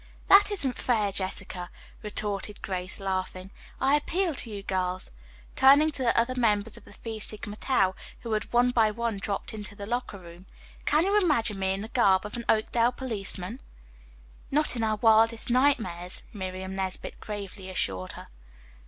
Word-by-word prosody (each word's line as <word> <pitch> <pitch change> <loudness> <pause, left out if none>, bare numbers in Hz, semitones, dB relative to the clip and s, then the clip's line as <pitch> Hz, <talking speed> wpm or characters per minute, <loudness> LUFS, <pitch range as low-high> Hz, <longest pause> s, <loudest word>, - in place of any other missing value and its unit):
"That 400 +1 +8
isn't 285 -11 -2
fair, 215 -5 +1
Jessica," 185 -2 -4 0.3
retorted 210 -1 -4
Grace, 185 0 -4
laughing. 185 -1 -3 0.3
"I 270 - +3
appeal 340 +4 0
to 255 - -8
you 200 -2 -6
girls," 185 -1 -2 0.4
turning 285 +4 +6
to 280 - -5
the 240 -2 +2
other 240 +2 +1
members 220 -3 +1
of - - -13
the - - -14
Phi 225 -1 -6
Sigma 210 -1 -6
Tau, 195 -6 +2 0.3
who 235 - -5
had 215 -1 -1
one 245 +1 +4
by 225 -3 +4
one 230 0 -2
dropped 200 +1 -3
into 210 -1 -6
the 200 -1 -7
locker 240 -2 -3
room. 175 0 -13 0.4
"Can 305 +2 +4
you 405 +2 +4
imagine 235 - +1
me 190 0 +1
in 195 - -4
the 215 - -5
garb 200 -5 +3
of 210 - -6
an 235 -1 -5
Oakdale 230 +2 +3
policeman?" 215 -2 -3 0.9
"Not 300 -1 +1
in 230 - -1
our 220 -1 +2
wildest 225 +2 +4
nightmares," 220 -10 +1
Miriam 190 -1 -5
Nesbit 190 -1 -4
gravely 200 -2 -7
assured 95 - -2
her. - - -9
215 Hz, 170 wpm, -28 LUFS, 190-245 Hz, 0.9 s, That